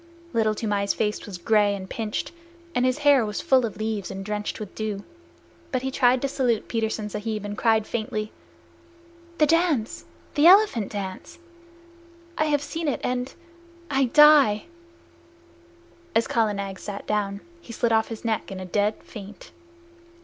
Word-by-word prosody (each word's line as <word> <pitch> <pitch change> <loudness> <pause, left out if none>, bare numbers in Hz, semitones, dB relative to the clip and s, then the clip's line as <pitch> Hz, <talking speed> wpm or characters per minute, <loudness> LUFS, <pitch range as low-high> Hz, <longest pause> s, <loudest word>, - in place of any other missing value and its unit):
Little 215 -1 +2
Toomai's 205 -2 -1
face 210 -1 -2
was 195 -3 -6
gray 205 +2 +2
and 190 -1 -7
pinched, 215 +1 -4 0.4
and 245 - +1
his 255 - +1
hair 280 -4 +6
was 210 -1 -3
full 255 -3 +3
of 205 - -10
leaves 215 -2 -3
and 195 0 -6
drenched 210 +1 -3
with 210 -3 -7
dew, 210 -2 -4 0.7
but 255 -2 -1
he 265 - -2
tried 255 -1 +3
to - - +2
salute 250 -5 0
Petersen 220 -2 -2
Sahib, 210 0 -4
and 205 0 -4
cried 220 -1 +2
faintly: 215 -2 -3 1.1
"The 305 - +5
dance 320 -7 +1 0.3
the 295 +3 +5
elephant 370 - +5
dance! 195 -2 -6 1.0
I 310 - +1
have 290 -2 +1
seen 325 +2 -4
it, 280 - 0
and 250 +1 -2 0.6
I 270 -1 +3
die!" 285 -5 +6 1.5
As 225 0 +3
Kala 220 -3 +1
Nag 195 -1 -5
sat 200 -1 -7
down, 200 -1 -1 0.2
he 245 - -11
slid 230 0 0
off 220 0 +3
his 225 0 -8
neck 220 -2 -1
in 190 - -6
a 185 - -6
dead 205 +3 0
faint. 205 -2 -11
220 Hz, 160 wpm, -25 LUFS, 205-255 Hz, 1.5 s, hair